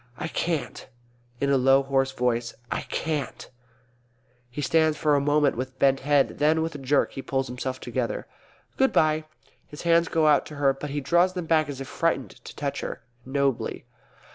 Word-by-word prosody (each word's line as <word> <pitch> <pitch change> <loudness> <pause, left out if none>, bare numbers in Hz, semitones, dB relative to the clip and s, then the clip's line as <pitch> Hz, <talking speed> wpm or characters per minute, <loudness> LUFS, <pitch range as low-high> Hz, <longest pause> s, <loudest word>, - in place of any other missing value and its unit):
_ - - -32
I 160 - -4
can't. 165 -3 -3 0.5
(In 140 0 +1
a 140 - +4
low 135 +1 +4
hoarse 135 0 +1
voice) 120 -2 -1 0.2
I - - -1
can't! 150 -6 -3 1.0
(He 120 - -8
stands 160 +1 +2
for 150 -1 +2
a 140 - +3
moment 145 0 +2
with 130 +2 -5
bent 135 0 +3
head; 145 0 +1
then 155 +2 +3
with 165 - -3
a 145 - -7
jerk 135 +1 +1
he 135 - -6
pulls 135 0 -1
himself 130 +1 -5
together.) - - -3 0.5
Good 265 0 +3
bye! 155 0 +2 0.5
_(His 150 - -8
hands 170 0 +4
go 160 -1 +1
out 150 -2 +4
to 150 - -9
her, 140 -1 +2
but 145 +2 -7
he 145 +1 -3
draws 175 +6 +3
them 180 -2 -4
back 155 -2 +2
as 135 -2 -6
if 135 - -6
frightened - - -1
to - - -10
touch - - -3
her. - - -6 0.2
Nobly.) 140 -1 -1
145 Hz, 190 wpm, -26 LUFS, 135-155 Hz, 1.0 s, a